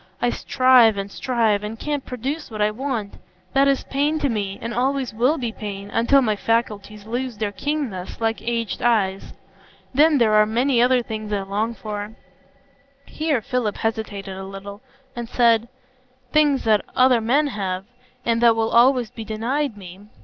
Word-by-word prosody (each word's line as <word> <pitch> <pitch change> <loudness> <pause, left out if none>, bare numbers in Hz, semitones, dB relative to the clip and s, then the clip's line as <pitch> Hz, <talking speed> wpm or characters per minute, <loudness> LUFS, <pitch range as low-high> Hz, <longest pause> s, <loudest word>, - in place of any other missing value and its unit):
I 245 - +1
strive 255 -6 +4
and 200 0 -4
strive, 225 -5 0
and 215 +2 -5
can't 295 -2 -2
produce 270 +6 -5
what 215 -2 -7
I 210 0 +2
want. 230 -3 -4 0.4
That 275 +1 +4
is 275 -1 +1
pain 290 +3 0
to 290 -2 0
me, 200 -4 -2
and 230 +1 -5
always 260 0 -1
will 250 +8 +2
be 240 -5 -3
pain, 200 -2 -7
until 265 +4 +3
my 215 -3 +1
faculties 210 -2 -2
lose 245 +1 -4
their 210 -1 -2
keenness, 245 -8 -4
like 225 0 -1
aged 230 -3 -2
eyes. 200 -5 0 0.6
Then 300 +2 +5
there 225 -4 +3
are 215 0 +5
many 240 +3 +2
other 250 0 +3
things 215 -2 -6
I 200 -1 -1
long 210 +4 -2
for,"—here 270 +6 -6
Philip 245 -4 -1
hesitated 210 -3 -3
a 190 - -7
little, 195 +1 -9 0.3
and 240 -1 -5
then - - -16
said,—"things 255 +4 0
that 215 -2 +3
other 255 -2 +4
men 270 +7 +2
have, 190 -2 -3 0.4
and 230 0 +1
that 235 -1 +6
will 225 0 0
always 245 -1 +4
be 230 -3 -7
denied 230 +4 -2
me. 190 +1 -12
230 Hz, 165 wpm, -22 LUFS, 210-260 Hz, 0.6 s, that